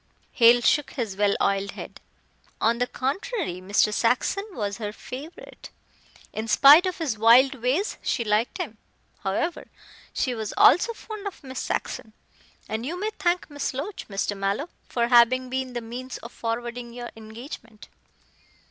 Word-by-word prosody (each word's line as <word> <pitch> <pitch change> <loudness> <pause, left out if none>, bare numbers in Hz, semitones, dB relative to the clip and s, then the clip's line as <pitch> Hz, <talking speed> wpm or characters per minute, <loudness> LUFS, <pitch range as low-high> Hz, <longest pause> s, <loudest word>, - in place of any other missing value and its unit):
Hale 240 0 +6
shook 295 +4 +2
his 225 -8 -3
well 205 0 +2
oiled 200 0 0
head. - - -9 0.6
"On 230 +2 +2
the 245 - +1
contrary, 275 - -3
Mr. 200 +2 +2
Saxon 250 - +1
was 205 - -3
her 210 -2 -3
favorite. 270 +9 -10 0.6
In 220 +1 -4
spite 290 - +8
of 370 - -3
his 280 - -2
wild 240 +4 +6
ways 270 - -1
she 235 - -1
liked 215 +2 0
him. 215 -1 -5 0.4
However, 270 - -2 0.4
she 255 - -1
was 220 -3 -5
also 360 +9 +6
fond 430 -2 -8
of 390 - -8
Miss 260 -1 -6
Saxon, 220 - -4 0.5
and 220 +1 -3
you 335 +8 -4
may 425 +2 -1
thank 355 -1 +1
Miss 290 -3 -4
Loach, 335 +9 -5
Mr. 200 0 -2
Mallow, 200 - -2 0.2
for 235 -1 0
having 250 +1 +5
been 260 -1 -2
the 240 - -3
means 250 +3 -7
of 235 - -10
forwarding 235 +1 -4
your 240 0 -7
engagement." 225 0 -10
240 Hz, 155 wpm, -25 LUFS, 220-285 Hz, 0.6 s, spite